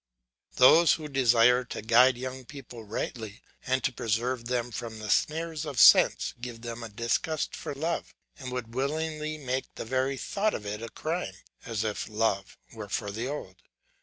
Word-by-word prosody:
Those 160 +6 +7
who 155 -2 -4
desire 125 -2 +4
to 115 - -7
guide 120 +3 +5
young 130 +1 -6
people 125 -3 -10
rightly 110 +1 -5 0.2
and 130 0 +1
to 130 - 0
preserve 115 +2 -1
them 120 0 -2
from 115 0 -6
the 110 -1 -4
snares 160 0 0
of 145 -6 -4
sense - - +6
give 120 -2 -7
them 120 0 -6
a 115 - -6
disgust 115 +8 -1
for - - -6
love, 160 +4 -3 0.2
and 130 -2 -6
would 120 -2 -5
willingly 155 +3 -2
make 130 -2 -2
the - - -6
very 130 +3 0
thought 210 - -1
of 105 - -6
it 105 +1 -4
a 115 - -6
crime, 165 +8 -4 0.3
as 110 -3 -2
if 105 0 -3
love 105 -3 -1 0.2
were 110 -3 -8
for 100 0 -2
the 115 +5 -4
old. 130 -10 -6
125 Hz, 175 wpm, -28 LUFS, 115-140 Hz, 0.3 s, Those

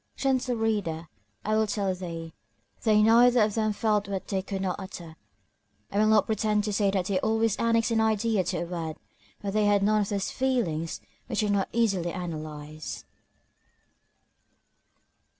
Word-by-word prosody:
Gentle 260 -2 0
reader, 200 -8 -1 0.4
I 215 +1 +1
will 220 0 +2
tell 200 -2 0
thee; 165 -3 -6 0.5
they 215 -2 +4
neither 240 +1 +6
of 210 -1 0
them 215 -1 +1
felt 210 -1 0
what 195 -1 -4
they 195 -2 -1
could 195 0 -4
not 185 0 -2
utter. 175 -4 -8 0.8
I 200 - 0
will 215 - +4
not 215 -1 +5
pretend 215 -1 +1
to 210 -1 -2
say 200 0 +2
that 195 -2 0
they 190 -1 0
always 220 +1 +1
annexed 230 0 +2
an 225 -1 +3
idea 220 -2 +2
to 175 -1 -1
a - - -4
word; 165 -3 -5 0.5
but 200 -1 -2
they 215 0 +2
had 205 -1 +3
none 215 +1 +3
of 200 - -2
those 200 -2 -2
feelings 200 -12 -1 0.3
which - - -1
are 210 - 0
not 200 -2 +1
easily 195 -7 +1
analyzed. 155 -3 -6
205 Hz, 170 wpm, -27 LUFS, 180-220 Hz, 0.8 s, neither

